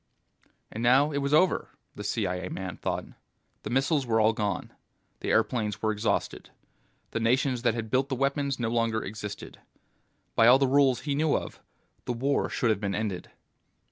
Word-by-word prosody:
And 115 - -5
now 130 +5 +4
it 140 - -1
was 140 0 -2
over, 180 +5 +3 0.2
the - - -8
CIA 90 +1 -2
man 95 -2 -5
thought. - - -3 0.6
The - - -6
missiles 135 +3 +1
were 115 -3 +1
all 110 +1 +4
gone. 105 -2 -3 0.5
The - - -4
airplanes 105 -4 +1
were 110 - +2
exhausted. 110 +1 -2 0.6
The - - -2
nations 125 +2 +1
that 120 -2 +1
had 110 -2 -5
built 130 +2 +1
the 135 - -1
weapons 140 0 0
no 115 -2 0
longer 115 -1 0
existed. 105 0 -7 0.7
By 115 - +5
all 125 +2 +8
the 135 - +2
rules 135 -1 +3
he 145 - -2
knew 150 +1 +2
of, - - -7 0.5
the 125 - -1
war 135 +4 0
should 120 - +1
have 105 - 0
been 100 -1 -1
ended. 105 -5 -3
120 Hz, 175 wpm, -28 LUFS, 110-135 Hz, 0.7 s, all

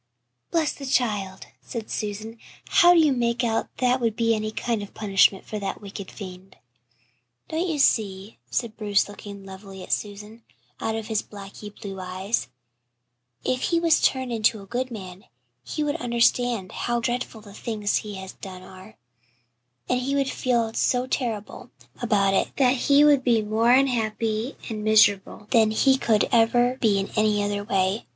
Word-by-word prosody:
"Bless 320 -3 +1
the 275 - -8
child," 205 -7 -1 0.2
said 230 -3 -7
Susan, 215 +2 -4 0.3
"how 350 -3 +6
do - - +6
you 310 -3 +5
make 240 0 0
out 225 -1 0
that 250 0 +2
would 230 -2 0
be 230 0 +2
any 215 0 -2
kind 230 -1 -2
of 205 - -7
a - - -30
punishment 195 -2 +3
for 215 - -5
that 195 - -4
wicked 200 -1 -8
fiend?" 190 -1 -10 0.9
"Don't 325 +3 -1
you 320 -3 -1
see," 205 -6 +1
said 230 -3 -2
Bruce, 205 -2 +1
looking 200 -1 -10
levelly 190 0 -10
at - - -2
Susan, 210 +2 -5 0.4
out 220 - -2
of 225 -1 -4
his 220 -1 -1
blackly 200 +1 -10
blue 200 -2 -8
eyes, 185 - -2 1.0
"if 255 0 0
he 335 - +2
was 330 -2 +3
turned 260 -2 +1
into 220 -1 +1
a 195 - -11
good 250 +5 -3
man 190 -5 -9 0.4
he 305 - -3
would 295 +2 -1
understand 235 - +1
how 240 0 -1
dreadful 240 -1 -3
the 205 -1 -13
things 210 -1 -1
he 210 -1 -5
has 190 0 -8
done 185 -1 -10
are, 185 +3 -14 0.9
and 250 - +1
he 270 +2 -1
would 275 -1 +1
feel 235 -3 0
so 250 +2 +1
terrible 235 -2 -4 0.3
about 200 -5 +2
it - - +2
that 255 -2 +4
he 280 +3 +4
would 290 -3 +5
be 230 -3 +3
more 220 +3 +2
unhappy 230 -2 +1
and 215 -2 -5
miserable 210 -1 +3
than 225 -3 +5
he 265 +5 +4
could 225 -5 +2
ever 240 +2 +3
be 210 -4 +3
in 195 0 -2
any 215 -1 +2
other 205 0 -2
way. 195 +1 0
220 Hz, 175 wpm, -24 LUFS, 205-245 Hz, 1.0 s, how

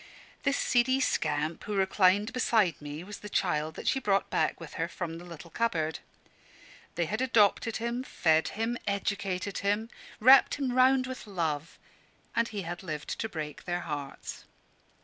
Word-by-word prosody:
This 280 - +1
seedy 260 +2 +3
scamp 155 - 0
who 210 - -3
reclined 195 +3 +3
beside 220 - +2
me 145 +2 -6
was 205 +2 -8
the 210 - -8
child 155 -6 0
that - - -7
she 270 - +3
brought 200 -5 +1
back - - +1
with 165 -2 -9
her 165 - +1
from 170 -2 -5
the - - -10
little 170 -1 -11
cupboard. 165 -10 0 1.0
They 170 - +1
had 215 +8 -2
adopted 225 -2 +3
him, 235 +2 -2
fed 160 -9 +2
him, 230 +2 -1
educated 200 -1 -2
him, 205 +3 0 0.3
wrapped 260 +4 +7
him 275 -3 -1
round 255 +1 +4
with 255 -3 -7
love; 165 -5 -2 0.6
and 230 0 +2
he 205 -4 -5
had 175 +1 -5
lived 155 -5 -5
to 220 - -2
break 155 -4 -6
their 175 0 -1
hearts. 145 -4 -6
200 Hz, 165 wpm, -29 LUFS, 165-230 Hz, 1.0 s, wrapped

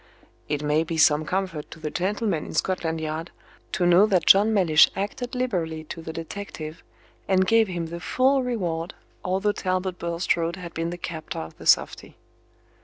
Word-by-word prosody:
It 150 0 -1
may 150 +2 +2
be 165 0 -4
some 155 -1 +4
comfort 185 -3 -3
to - - -11
the 155 -1 -4
gentlemen 190 -2 -1
in - - -8
Scotland 165 -2 -1
Yard 160 +2 -4 0.4
to 180 - +1
know 175 +4 +6
that 190 -4 +2
John 205 +3 +6
Mellish 175 -8 +5
acted 245 +6 -4
liberally 175 -11 -2
to 170 -1 -6
the 160 - -6
detective, 165 -2 -7 0.5
and 190 -1 +3
gave 225 +2 +4
him 175 -3 -3
the 170 +1 -6
full 265 +8 +2
reward, 180 -9 -3 0.3
although 190 +3 +1
Talbot 185 -2 -2
Bulstrode 170 0 -1
had 180 -2 -9
been 165 +1 -2
the 175 - -5
captor 165 -2 -6
of 80 - -6
the - - -7
softy. - - +2
175 Hz, 175 wpm, -25 LUFS, 160-195 Hz, 0.5 s, know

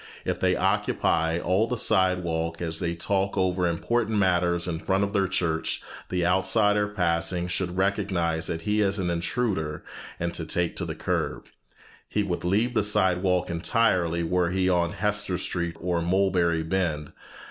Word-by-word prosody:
If - - -1
they - - +2
occupy 80 0 +1
all 95 +6 +1
the 125 +1 -2
sidewalk 85 -6 +1
as 80 -2 -2
they 85 -2 -1
talk 95 +3 0
over 90 -1 +1
important 110 +6 0
matters 90 -3 +2
in 80 -2 -2
front 95 +3 +1
of 100 0 -2
their 100 -2 +2
church, 85 -3 -1 0.3
the 90 -1 0
outsider 105 +3 +3
passing 90 -3 0
should 90 0 -2
recognize 95 -4 0
that 80 -1 -3
he 105 +4 +1
is 100 0 +1
an 90 -3 -1
intruder 85 -3 -2 0.4
and 85 0 -2 0.2
take 85 -1 0
to - - -2
the - - -5
curb. - - -2 0.6
He 105 - 0
would 90 -3 -3
leave 105 +7 +1
the 110 - +2
sidewalk 90 -3 +1
entirely 85 -2 +1
were 90 +1 +1
he 95 +1 +1
on 85 -2 +1
Hester 105 -3 0
Street 85 -2 -3
or 85 -1 -1
Mulberry 90 -2 +1
Bend. 80 -4 -2
90 Hz, 160 wpm, -26 LUFS, 85-100 Hz, 0.6 s, outsider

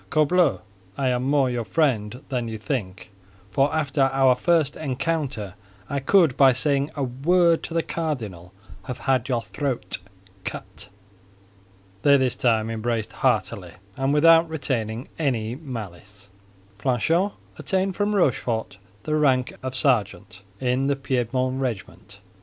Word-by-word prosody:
"Corbleu! 155 +1 +3 0.4
I 135 -2 +1
am 125 -1 0
more 135 0 +2
your 120 -2 -2
friend 125 -5 0
than 125 -3 -2
you 110 -1 -5
think—for 100 0 -3
after 140 -3 +1
our 135 -1 +4
very 125 - -11
first 165 -5 +2
encounter, 140 - -2 0.4
I 140 - 0
could 160 -1 +4
by 135 -2 +6
saying 140 +2 +1
a 145 - -2
word 165 +7 +2
to 165 - -7
the 165 - +2
cardinal 110 - -4 0.3
have 125 -2 -5
had 130 -1 0
your 120 -3 0
throat 140 -2 -1 0.4
cut!" - - -7 1.1
They 140 +3 +6
this 130 -2 +1
time 115 -2 +1
embraced 115 0 -2
heartily, 110 -8 -1 0.2
and 135 +1 0
without 165 +2 +5
retaining 125 -6 -3
any 120 -7 0
malice. 105 - -9 0.5
Planchet 160 - +1 0.3
obtained 190 0 -1
from 205 0 0
Rochefort 115 - 0 0.2
the 155 - -1
rank 130 -4 +2
of 130 0 -5
sergeant 110 -7 0 0.2
in 130 +1 0
the 140 - +2
Piedmont 130 -1 -1
regiment. 120 -7 -5
M. - - -30
130 Hz, 135 wpm, -24 LUFS, 115-150 Hz, 1.1 s, by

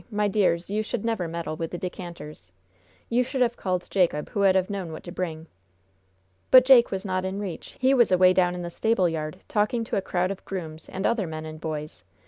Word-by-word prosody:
My 210 -2 0
dears, 185 -4 +1
you 210 +2 -1
should 215 0 -4
never 225 -7 -1
meddle 165 -1 -4
with 165 0 -4
the 175 - -5
decanters. 170 - -8 0.6
You 245 +2 +2
should 260 +1 -3
have 240 -1 0
called 180 -4 -2
Jacob, 175 -6 +1
who - - -4
would 195 -1 +4
have 185 -1 +2
known 195 -5 -4
what 155 - -8
to 175 - -8
bring." 165 -3 -4 1.0
"But 255 -1 +8
Jake 255 -3 +7
was 190 +1 -4
not 185 -1 -1
in 190 +1 -3
reach. 195 -5 -7
He 260 +1 +4
was 240 -6 +4
away 185 0 +6
down 180 -1 +2
in 175 - -5
the 170 - -5
stable 220 -2 +2
yard, 155 -2 -4
talking 215 +2 0
to 225 - -2
a - - +1
crowd 185 0 -1
of 195 - -7
grooms 160 -4 -7
and 190 - -4
other 225 -6 +1
men 155 0 -6
and 155 0 -9
boys. 150 - -5
185 Hz, 225 wpm, -25 LUFS, 165-210 Hz, 1.0 s, But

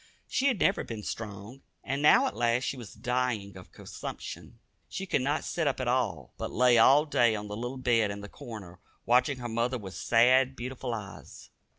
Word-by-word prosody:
She 275 0 +1
had 250 -8 +1
never - - +2
been 110 -2 -7
strong, 105 +5 -7 0.2
and 140 +2 -2
now 150 - +6
at - - -2
last 120 +2 +1
she 140 - -2
was 120 -5 -10
dying 125 -6 -2
of 90 -1 -13
consumption. - - -8 0.3
She 195 - -5
could 160 - 0
not 145 +4 0
sit 165 -3 -1
up 135 - 0
at 130 - -2
all, 125 +1 -1
but - - -3
lay 125 0 +4
all 140 +6 +6
day 120 -6 +3
on 105 0 -5
the 105 - -5
little 120 +4 -5
bed 120 -4 +2
in 100 0 -5
the 105 - -8
corner, 100 -5 -10 0.3
watching 125 +3 +3
her 120 -1 -5
mother 120 +2 -1
with 95 -5 -9
sad, 130 +3 +3
beautiful 125 -1 -4
eyes. 100 -3 -10
120 Hz, 200 wpm, -29 LUFS, 110-130 Hz, 0.3 s, now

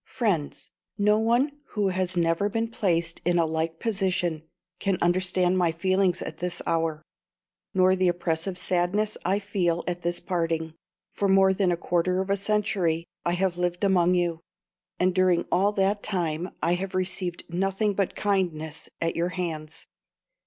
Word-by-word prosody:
"FRIENDS, 205 - -2 0.3
No 210 +1 +3
one 250 +6 +1 0.2
who 205 -2 +2
has 185 -1 -1
never 170 +4 +2
been 225 +2 -1
placed 170 -6 0
in 175 +1 +2
a 170 - +3
like 160 +1 -2
position 180 -7 -1 0.3
can 195 -1 0
understand 180 +1 +2
my 175 -2 +3
feelings 185 +2 +1
at - - -7
this 180 0 -2
hour, 165 -2 0 0.7
nor 185 0 +5
the 185 -1 +2
oppressive 175 +1 -1
sadness 185 +4 +1
I 195 - +2
feel 185 -4 -1
at 175 0 -2
this 175 0 -1
parting. 165 -3 -2 0.4
For 200 - -1
more 190 0 +5
than 190 -2 +1
a 175 - 0
quarter 175 +2 0
of 190 +1 -1
a - - +4
century 195 -5 0 0.2
I 175 - +2
have 180 -1 0
lived 175 +1 -1
among 180 -2 +4
you, 175 -2 0 0.6
and 185 0 +3
during 185 -2 +3
all 200 +3 +3
that 200 +1 +1
time 175 -3 -2
I 170 - +3
have 185 +2 -3
received 185 -1 -2
nothing 195 +4 0
but 195 -1 -1
kindness 165 -7 -1
at 165 0 0
your 170 +1 0
hands. 165 -4 -5
180 Hz, 160 wpm, -26 LUFS, 170-195 Hz, 0.7 s, nor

